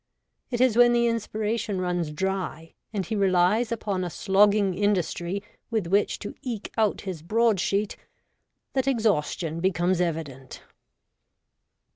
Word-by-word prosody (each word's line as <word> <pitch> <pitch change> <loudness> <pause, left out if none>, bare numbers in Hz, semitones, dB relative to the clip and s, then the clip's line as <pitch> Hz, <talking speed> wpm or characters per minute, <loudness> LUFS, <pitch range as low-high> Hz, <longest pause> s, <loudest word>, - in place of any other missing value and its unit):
It 240 - -2
is 255 -4 +4
when 240 0 +7
the 235 0 +3
inspiration 220 -2 -1
runs 175 -3 -1
dry, 165 -1 -3 0.2
and 200 -3 -2
he 225 - -3
relies 195 +4 +2
upon 205 -5 -2
a 180 - -2
slogging 200 +1 +3
industry 195 -1 -1 0.3
with 220 -5 -1
which 200 +4 +1
to 205 - -6
eke 235 -5 -5
out 220 -2 +1
his 185 -6 -6
broad 220 +3 +2
sheet, 200 +3 0 0.8
that 265 0 0
exhaustion 185 - 0
becomes 180 0 +1
evident. 150 -6 -4
200 Hz, 130 wpm, -26 LUFS, 175-220 Hz, 0.8 s, when